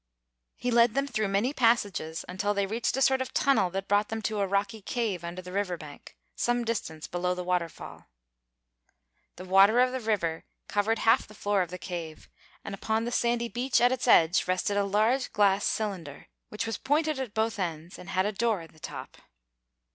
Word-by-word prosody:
He 245 Hz, -, -2 dB
led 235 Hz, 0 st, +4 dB
them 275 Hz, 0 st, +1 dB
through 220 Hz, -6 st, -1 dB
many 200 Hz, +8 st, 0 dB
passages, 205 Hz, -, +1 dB
until 200 Hz, +3 st, -1 dB
they 200 Hz, 0 st, +1 dB
reached 225 Hz, +5 st, -1 dB
a 270 Hz, -, +3 dB
sort 265 Hz, 0 st, +3 dB
of 260 Hz, -, -5 dB
tunnel 220 Hz, -10 st, +3 dB
that 195 Hz, +2 st, -4 dB
brought 205 Hz, +1 st, +2 dB
them 225 Hz, 0 st, -4 dB
to 215 Hz, +1 st, -1 dB
a 200 Hz, -, +1 dB
rocky 200 Hz, +2 st, -1 dB
cave 205 Hz, -5 st, -2 dB
under 175 Hz, +2 st, -6 dB
the 180 Hz, -, -9 dB
river 190 Hz, -2 st, -1 dB
bank, 150 Hz, -3 st, -12 dB, 0.2 s
some 240 Hz, 0 st, 0 dB
distance 160 Hz, -9 st, -3 dB
below 180 Hz, +1 st, -1 dB
the 180 Hz, -, -4 dB
waterfall. 175 Hz, -2 st, -4 dB, 1.3 s
The 185 Hz, -, -9 dB
water 195 Hz, +5 st, +5 dB
of 250 Hz, 0 st, +4 dB
the 260 Hz, -, -3 dB
river 195 Hz, -8 st, -1 dB, 0.2 s
covered 210 Hz, +2 st, +1 dB
half 225 Hz, -, +3 dB
the 215 Hz, -, -15 dB
floor 205 Hz, -1 st, +1 dB
of 180 Hz, -, -2 dB
the 180 Hz, -, -6 dB
cave, 170 Hz, -4 st, -7 dB, 0.4 s
and 200 Hz, -, -5 dB
upon 220 Hz, +3 st, -1 dB
the 240 Hz, -, -3 dB
sandy 235 Hz, 0 st, +1 dB
beach 245 Hz, +3 st, 0 dB
at 245 Hz, +1 st, +4 dB
its 255 Hz, -1 st, -2 dB
edge 170 Hz, -6 st, +5 dB
rested 185 Hz, +2 st, 0 dB
a 200 Hz, 0 st, +2 dB
large 220 Hz, +6 st, +1 dB
glass 200 Hz, -2 st, +3 dB
cylinder, 185 Hz, -10 st, -3 dB, 0.2 s
which 210 Hz, +2 st, -3 dB
was 225 Hz, -1 st, -3 dB
pointed 300 Hz, +1 st, +1 dB
at 245 Hz, -5 st, -5 dB
both 220 Hz, -1 st, 0 dB
ends 170 Hz, -1 st, -4 dB
and 180 Hz, -, -10 dB
had 185 Hz, 0 st, +1 dB
a 210 Hz, -, 0 dB
door 215 Hz, -2 st, 0 dB
in 165 Hz, -, -12 dB
the 155 Hz, -, -20 dB
top. -, -, -8 dB
205 Hz, 200 wpm, -28 LUFS, 180-235 Hz, 1.3 s, water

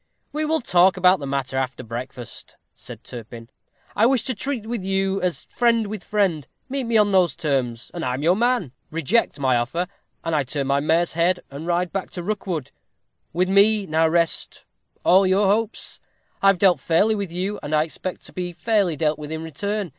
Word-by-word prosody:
"We 305 Hz, +1 st, -1 dB
will 315 Hz, 0 st, +1 dB
talk 185 Hz, -3 st, +4 dB
about 185 Hz, 0 st, +5 dB
the 140 Hz, -, -5 dB
matter 135 Hz, -1 st, -2 dB
after 130 Hz, -1 st, -2 dB
breakfast," 120 Hz, +1 st, -7 dB, 0.2 s
said -, -, -11 dB
Turpin. 115 Hz, 0 st, -10 dB, 0.5 s
"I 225 Hz, -, +5 dB
wish 260 Hz, -2 st, +2 dB
to 260 Hz, -, -2 dB
treat 250 Hz, 0 st, -3 dB
with 230 Hz, -3 st, -3 dB
you 195 Hz, 0 st, 0 dB
as 180 Hz, -2 st, -1 dB
friend 230 Hz, -2 st, +2 dB
with 210 Hz, -1 st, -6 dB
friend. 185 Hz, -, 0 dB, 0.2 s
Meet 270 Hz, -1 st, -2 dB
me 230 Hz, -1 st, +2 dB
on 210 Hz, -1 st, +4 dB
those 185 Hz, -3 st, +3 dB
terms, 125 Hz, -6 st, -2 dB
and 170 Hz, -, -5 dB
I 125 Hz, -2 st, -1 dB
am 135 Hz, -, -5 dB
your 175 Hz, +3 st, +4 dB
man; 235 Hz, -, +1 dB, 0.2 s
reject 165 Hz, -, +1 dB
my 130 Hz, -3 st, +2 dB
offer, 135 Hz, +10 st, -1 dB, 0.4 s
and 165 Hz, -1 st, -1 dB
I 150 Hz, -, +3 dB
turn 140 Hz, +2 st, -2 dB
my 140 Hz, +1 st, +2 dB
mare's 165 Hz, +4 st, +1 dB
head, 175 Hz, +2 st, +2 dB
and 145 Hz, +4 st, -7 dB
ride 175 Hz, 0 st, 0 dB
back 195 Hz, -1 st, -3 dB
to 175 Hz, -, -3 dB
Rookwood. 175 Hz, -8 st, -3 dB, 0.6 s
With 180 Hz, +3 st, +1 dB
me 200 Hz, +2 st, +5 dB
now 160 Hz, -1 st, +2 dB
rest 170 Hz, 0 st, 0 dB, 0.4 s
all 190 Hz, +2 st, +6 dB
your 195 Hz, +2 st, +3 dB
hopes. 215 Hz, +3 st, -1 dB, 0.4 s
I 195 Hz, -, +4 dB
have 195 Hz, -1 st, +5 dB
dealt 180 Hz, -4 st, +4 dB
fairly 170 Hz, +10 st, +3 dB
with 200 Hz, -5 st, -3 dB
you, 190 Hz, +4 st, -3 dB
and 150 Hz, +1 st, -2 dB
I 155 Hz, -, +4 dB
expect 175 Hz, +3 st, -6 dB
to -, -, -11 dB
be 180 Hz, -1 st, -4 dB
fairly 195 Hz, -1 st, +1 dB
dealt 155 Hz, 0 st, 0 dB
with 150 Hz, 0 st, -7 dB
in 160 Hz, 0 st, -4 dB
return. 200 Hz, +5 st, -3 dB
175 Hz, 200 wpm, -23 LUFS, 150-205 Hz, 0.6 s, all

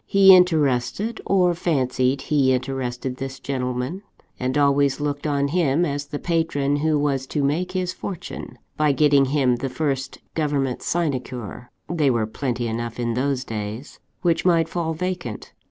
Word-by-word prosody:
He 195 Hz, -1 st, +8 dB
interested, 165 Hz, -, +2 dB
or 180 Hz, -2 st, +3 dB
fancied 130 Hz, -5 st, 0 dB
he 135 Hz, -3 st, +3 dB
interested, 130 Hz, -1 st, -3 dB
this 135 Hz, 0 st, -6 dB
gentleman; 125 Hz, +6 st, -3 dB, 0.4 s
and 130 Hz, +2 st, -1 dB
always 140 Hz, -1 st, +3 dB
looked 145 Hz, 0 st, -2 dB
on 140 Hz, -1 st, +1 dB
him 165 Hz, 0 st, +2 dB
as 145 Hz, -2 st, -3 dB
the 145 Hz, -, -4 dB
patron 145 Hz, -4 st, 0 dB
who 155 Hz, +1 st, +1 dB
was 140 Hz, -2 st, 0 dB
to 145 Hz, 0 st, -1 dB
make 175 Hz, +6 st, 0 dB
his 185 Hz, -1 st, -1 dB
fortune, 185 Hz, -2 st, -7 dB, 0.2 s
by 150 Hz, -2 st, +3 dB
getting 145 Hz, -1 st, +4 dB
him 130 Hz, -3 st, +2 dB
the 135 Hz, -, -3 dB
first 135 Hz, -1 st, -2 dB, 0.2 s
government 145 Hz, -5 st, -1 dB
sinecure 130 Hz, -, -3 dB, 0.2 s
(they 155 Hz, -5 st, +1 dB
were 115 Hz, -3 st, +1 dB
plenty 120 Hz, +1 st, -3 dB
enough 115 Hz, +1 st, -4 dB
in 120 Hz, -1 st, -1 dB
those 130 Hz, +1 st, 0 dB
days!) 110 Hz, +3 st, -6 dB, 0.2 s
which 170 Hz, -2 st, +2 dB
might 170 Hz, -3 st, +3 dB
fall 165 Hz, -2 st, -2 dB
vacant. 175 Hz, -, -4 dB
140 Hz, 155 wpm, -23 LUFS, 130-160 Hz, 0.4 s, He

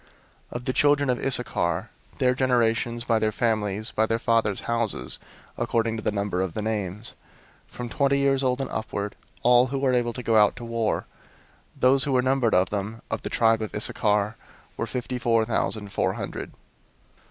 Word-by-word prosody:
001:028 -, -, -12 dB
Of 120 Hz, 0 st, -4 dB
the 130 Hz, -, 0 dB
children 145 Hz, -1 st, +3 dB
of 125 Hz, -, -2 dB
Issachar, 110 Hz, -7 st, 0 dB, 0.3 s
their 125 Hz, -2 st, +3 dB
generations, 120 Hz, -2 st, +1 dB
by 115 Hz, -2 st, +2 dB
their 110 Hz, 0 st, +1 dB
families, 110 Hz, -2 st, 0 dB
by 110 Hz, +1 st, +1 dB
their 115 Hz, -, +1 dB
fathers' 115 Hz, -3 st, +1 dB
houses, 115 Hz, -3 st, -1 dB, 0.4 s
according 115 Hz, -1 st, 0 dB
to 110 Hz, -, -4 dB
the 110 Hz, -, 0 dB
number 100 Hz, -3 st, -1 dB
of 95 Hz, -3 st, -3 dB
the 110 Hz, -, -2 dB
names, 105 Hz, 0 st, -3 dB, 0.5 s
from 125 Hz, -, -6 dB
twenty 140 Hz, +3 st, +1 dB
years 140 Hz, -1 st, +2 dB
old 130 Hz, -1 st, +1 dB
and 135 Hz, -, -3 dB
upward, 105 Hz, -2 st, -3 dB, 0.3 s
all 125 Hz, +1 st, +6 dB
who 135 Hz, +2 st, -3 dB
were 135 Hz, -1 st, +1 dB
able 120 Hz, -1 st, +1 dB
to 125 Hz, -, -6 dB
go 115 Hz, -1 st, +3 dB
out 105 Hz, -1 st, +5 dB
to 120 Hz, -, -8 dB
war; 115 Hz, -2 st, -1 dB, 0.7 s
001:029 -, -, -21 dB
those 135 Hz, +1 st, +5 dB
who 140 Hz, -, 0 dB
were 125 Hz, -1 st, +3 dB
numbered 130 Hz, -3 st, +2 dB
of 90 Hz, 0 st, +3 dB
them, 105 Hz, +2 st, -4 dB
of -, -, -2 dB
the -, -, -4 dB
tribe 115 Hz, -1 st, +3 dB
of 110 Hz, -, -4 dB
Issachar, 105 Hz, 0 st, 0 dB, 0.4 s
were 115 Hz, -, -3 dB
fifty 125 Hz, 0 st, -3 dB
four 115 Hz, -2 st, +2 dB
thousand 110 Hz, -2 st, -1 dB
four -, -, 0 dB
hundred. -, -, -5 dB
115 Hz, 190 wpm, -25 LUFS, 110-125 Hz, 0.7 s, all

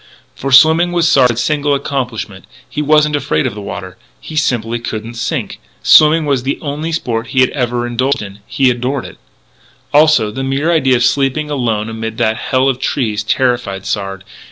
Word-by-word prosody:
For 135 Hz, -, -4 dB
swimming 160 Hz, +6 st, +5 dB
was 170 Hz, -1 st, +2 dB
Sard's 125 Hz, -7 st, +3 dB
single 145 Hz, -1 st, +1 dB
accomplishment. 120 Hz, -8 st, -4 dB, 0.2 s
He 150 Hz, -, -4 dB
wasn't 150 Hz, 0 st, +3 dB
afraid 145 Hz, 0 st, -1 dB
of 125 Hz, -, -2 dB
the 105 Hz, -, -8 dB
water; 95 Hz, -1 st, -7 dB, 0.2 s
he 155 Hz, -, -10 dB
simply 120 Hz, -6 st, 0 dB
couldn't 115 Hz, 0 st, -6 dB
sink. 120 Hz, -, -4 dB, 0.2 s
Swimming 155 Hz, +1 st, +6 dB
was 140 Hz, -3 st, 0 dB
the 135 Hz, +2 st, -2 dB
only 150 Hz, +3 st, -4 dB
sport 115 Hz, -7 st, -2 dB
he 130 Hz, +2 st, +3 dB
ever 120 Hz, -2 st, -1 dB
had 120 Hz, -, -4 dB
indulged 130 Hz, +2 st, 0 dB
in. 100 Hz, 0 st, -10 dB
He 130 Hz, -2 st, +2 dB
adored 125 Hz, +2 st, -3 dB
it. -, -, -12 dB, 0.7 s
Also, 150 Hz, -8 st, +4 dB
the 135 Hz, +5 st, -5 dB
mere 135 Hz, +5 st, 0 dB
idea 135 Hz, -6 st, +3 dB
of 120 Hz, -, +1 dB
sleeping 140 Hz, +4 st, 0 dB
alone 115 Hz, -6 st, -1 dB
amid 110 Hz, 0 st, -5 dB
that 110 Hz, 0 st, +1 dB
hell 130 Hz, +2 st, 0 dB
of 130 Hz, -2 st, 0 dB
trees 110 Hz, -7 st, -1 dB
terrified 120 Hz, -4 st, -1 dB
Sard. 95 Hz, -2 st, -4 dB
130 Hz, 180 wpm, -15 LUFS, 115-145 Hz, 0.7 s, Swimming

